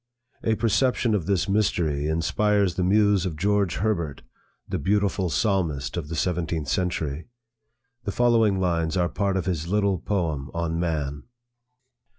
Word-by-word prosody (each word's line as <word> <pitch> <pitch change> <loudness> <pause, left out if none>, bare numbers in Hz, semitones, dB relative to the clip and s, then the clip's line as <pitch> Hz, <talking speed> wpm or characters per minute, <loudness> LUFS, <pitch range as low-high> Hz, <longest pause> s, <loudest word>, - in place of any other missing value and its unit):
A 110 - +2
perception 120 +1 +1
of 95 -6 -1
this 95 -2 +1
mystery 85 -8 +1
inspires 100 +4 +1
the 90 - -1
muse 100 0 +3
of 90 -4 -3
George 100 +1 +1
Herbert, 85 -8 -2 0.4
the - - -2
beautiful 100 +2 +1
psalmist 80 0 0
of 85 -4 -4
the 80 - -5
seventeenth 80 -3 -1
century. 85 -4 -2 0.8
The 100 - -1
following 115 -4 +3
lines 85 -1 0
are 90 -1 +1
part 100 +3 0
of 95 - -2
his 85 -4 -2
little 100 -1 +1
poem 80 -9 -2
on 85 -1 -1
Man. 75 -4 -2
90 Hz, 145 wpm, -25 LUFS, 80-100 Hz, 0.8 s, muse